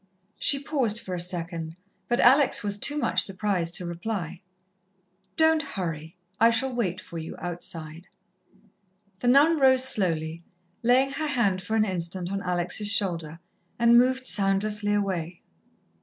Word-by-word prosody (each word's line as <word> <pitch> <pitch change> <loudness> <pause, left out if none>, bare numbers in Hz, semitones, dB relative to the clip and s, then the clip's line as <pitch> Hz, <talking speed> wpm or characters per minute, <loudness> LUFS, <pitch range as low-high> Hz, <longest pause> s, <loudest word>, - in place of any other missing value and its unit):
She 280 - 0
paused 270 -6 0
for 190 -5 -7
a 180 - -3
second, 170 -2 -2 0.3
but 240 - 0
Alex 265 0 +5
was 205 -1 0
too 295 +6 -1
much 295 - +1
surprised 185 -3 -1
to 180 - -3
reply. 175 -1 -5 1.0
"Don't 320 -1 +3
hurry. 165 - -6 0.2
I 230 - +6
shall 255 +3 0
wait 195 -7 -2
for 170 -3 -9
you 160 - -8
outside." 165 -1 -5 1.1
The 245 - -3
nun 295 +6 +4
rose 260 -1 +5
slowly, 170 - +2 0.4
laying 255 +3 +2
her 305 +3 -3
hand 220 -10 0
for 220 - -4
an 215 -1 +2
instant 180 -1 -3
on 195 0 -3
Alex' 180 +2 -1
shoulder, 170 -6 0 0.4
and 235 0 +4
moved 255 +2 +3
soundlessly 205 0 +1
away. 180 -4 -3
200 Hz, 140 wpm, -25 LUFS, 175-245 Hz, 1.1 s, I